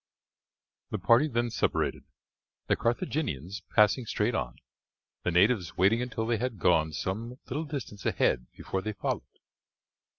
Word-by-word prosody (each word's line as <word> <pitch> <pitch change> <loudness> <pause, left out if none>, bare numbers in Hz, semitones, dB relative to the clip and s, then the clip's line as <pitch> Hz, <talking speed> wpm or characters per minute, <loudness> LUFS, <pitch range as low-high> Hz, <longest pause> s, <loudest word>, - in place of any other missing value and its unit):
The - - -2
party 120 +6 +4
then 120 -3 0
separated, - - 0 0.6
the - - +2
Carthaginians 115 - -2
passing 110 +3 +4
straight 105 +4 0
on, 65 - -2 0.7
the - - 0
natives 90 -1 +3
waiting 100 +6 +4
until 115 -2 -2
they 115 0 +1
had 120 0 -2
gone 80 -3 +3
some 110 +10 -4
little 150 +5 -3
distance 130 -9 -6
ahead 60 0 +1
before 95 - -4
they 110 +2 -3
followed. 100 - -2
110 Hz, 135 wpm, -29 LUFS, 95-120 Hz, 0.7 s, party